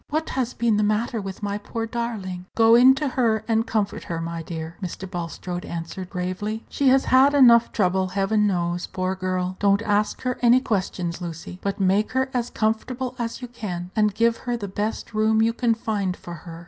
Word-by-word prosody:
What 310 +1 -1
has 255 -2 -2
been 230 -3 +2
the - - +2
matter 215 +2 0
with 195 +1 -7
my 205 0 -2
poor 225 +2 -4
darling?" 215 -6 -4
"Go 225 0 +6
in 255 +3 +7
to 285 +1 -1
her, 230 -4 +1
and 225 0 +1
comfort 210 -3 -1
her, 165 -1 -3
my 165 0 -4
dear," 165 0 -6
Mr. 185 +1 -5
Bulstrode 175 0 -5
answered, 170 +2 -6
gravely; 195 +4 -4
"she 280 - 0
has 265 +1 +5
had 270 +3 +5
enough 235 -4 +6
trouble, 190 -2 +1
Heaven 200 +3 +1
knows, 175 -2 -1
poor 185 0 -2
girl. 185 0 -2
Don't 200 +1 +3
ask 210 -1 0
her 250 -1 -2
any 245 +1 +6
questions, 185 -7 -2
Lucy, 170 +1 -7
but 200 0 -3
make 195 +2 +2
her 260 0 0
as 245 -1 -1
comfortable 240 +4 -1
as 235 +2 -4
you - - -4
can, 185 -7 -6
and 210 -2 +2
give 230 +1 +2
her 245 -1 -3
the 205 -3 -5
best 205 +4 -4
room 220 0 +2
you 225 +1 +3
can 235 -1 +1
find 205 -5 -2
for 175 - -9
her. 165 0 -9
210 Hz, 200 wpm, -24 LUFS, 185-235 Hz, -, in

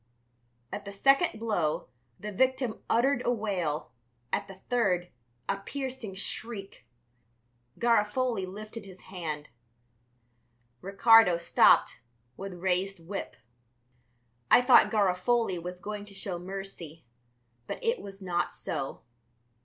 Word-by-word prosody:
At 205 - -5
the 200 - -7
second 275 - +3
blow 190 -9 -1 0.3
the 210 - -5
victim 260 +2 0
uttered 250 +2 +3
a 245 - +2
wail, 185 - -2 0.4
at - - 0
the 195 - -10
third 185 -8 +1 0.4
a - - 0
piercing 255 -1 -6
shriek. 195 - -5 0.9
Garofoli 230 -2 +1
lifted 215 +3 -8
his 190 -2 -13
hand; 155 -5 -4 1.3
Ricardo 200 -1 +6
stopped 170 - +4 0.4
with 195 0 -6
raised 185 +1 -1
whip. 200 +1 -5 1.1
I 245 - +7
thought 250 0 +7
Garofoli 200 0 +1
was 180 +1 -6
going 205 +1 -6
to 200 -1 -13
show 190 -3 -4
mercy, 180 -5 -8 0.6
but - - -4
it 465 +1 +1
was 195 0 -10
not 175 -1 -1
so. - - -4
200 Hz, 115 wpm, -29 LUFS, 180-230 Hz, 1.3 s, I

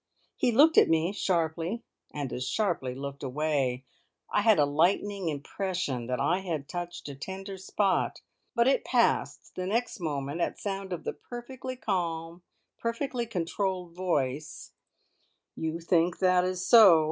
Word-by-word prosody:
He 245 - +2
looked 295 +7 +7
at - - +4
me 165 +2 +2
sharply, 170 +3 -1 0.3
and 140 -4 -4
as 125 +1 -3
sharply 170 -12 -1
looked 140 +1 -6
away. 135 -2 -1 0.5
I - - +3
had 220 -2 +5
a 145 - +5
lightning 180 +5 +1
impression 145 -4 -3
that 125 0 -1
I 165 +7 +2
had 165 -7 -4
touched 175 -1 -5
a 140 - -6
tender 190 +7 -7
spot, 190 +1 0 0.4
but 235 0 +4
it 270 - +3
passed - - +1
the 185 0 -4
next 230 +2 -1
moment 145 -1 -3
at - - -1
sound 195 -1 -4
of 175 - -4
the - - -3
perfectly 255 +1 -7
calm, 170 -6 -2 0.4
perfectly 235 +1 -2
controlled 185 -2 -2
voice: 155 -5 -2 0.8
"You 160 +1 -3
think 170 0 +2
that 180 -1 +3
is 185 0 -2
so? 200 -8 +8
175 Hz, 145 wpm, -29 LUFS, 150-200 Hz, 0.8 s, so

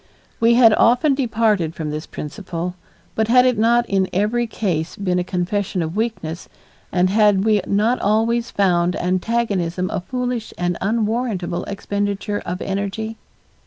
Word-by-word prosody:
We 230 +1 +4
had 230 -3 +7
often 250 +7 +4
departed 220 - +1
from 155 -2 -4
this 155 +1 -5
principle, 175 +2 -5 0.4
but 220 0 0
had 250 +2 +5
it 250 -1 +3
not 235 +2 +3
in 195 -1 +1
every 215 +5 0
case 175 -7 -2
been 180 -3 -1
a - - 0
confession 180 0 -2
of 160 +2 -5
weakness, 210 -7 -3 0.4
and 185 0 +2
had 205 -2 +4
we 215 -2 +3
not 220 +5 +2
always 230 +3 +1
found 180 -3 +1
antagonism 185 -1 -1
a 200 - -2
foolish 250 +1 -4
and 175 0 -1
unwarrantable 215 -4 -1
expenditure 205 0 -3
of 180 +1 -3
energy? 200 +3 -3
205 Hz, 145 wpm, -20 LUFS, 180-230 Hz, 0.4 s, had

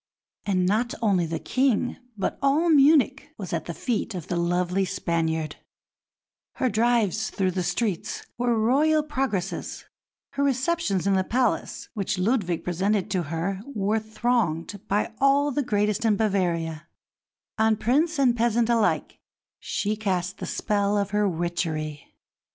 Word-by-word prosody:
And 185 -2 +2
not 220 +6 +1
only 190 -6 +2
the 165 0 -2
King, 255 - 0 0.2
but 195 - -2
all 295 +5 +3
Munich 280 -2 +4
was 185 -6 -6
at 160 -2 -2
the 170 - -5
feet 225 -3 -2
of 175 -4 -7
the 175 - -1
lovely 175 +2 +1
"Spaniard"; 160 -4 -1 1.0
her 260 - 0
drives 220 -1 +1
through 190 -2 0
the 185 +1 -2
streets 195 0 -2
were 240 -1 +1
Royal 295 +8 +3
progresses; 260 - -3 0.5
her 280 - -1
receptions 265 - 0
in 200 - +3
the 190 -1 +2
palace 245 +3 -1
which 205 -2 -2
Ludwig 185 -4 0
presented 190 +3 0
to 185 -2 +1
her 180 +4 -2
were 210 +2 +1
thronged 215 -5 -1
by 210 +3 0
all 280 +1 +4
the 290 - 0
greatest 210 -2 0
in 220 -2 +3
Bavaria; 170 -6 -1 0.7
on 220 0 +4
Prince 295 +10 +1
and 255 -4 +3
peasant 235 0 +1
alike 230 -2 +1 0.4
she 210 +1 -2
cast 190 -3 -2
the - - -5
spell 205 -1 0
of 200 -1 -1
her 210 -1 +2
witchery. 160 -3 -3
210 Hz, 145 wpm, -25 LUFS, 180-240 Hz, 1.0 s, Munich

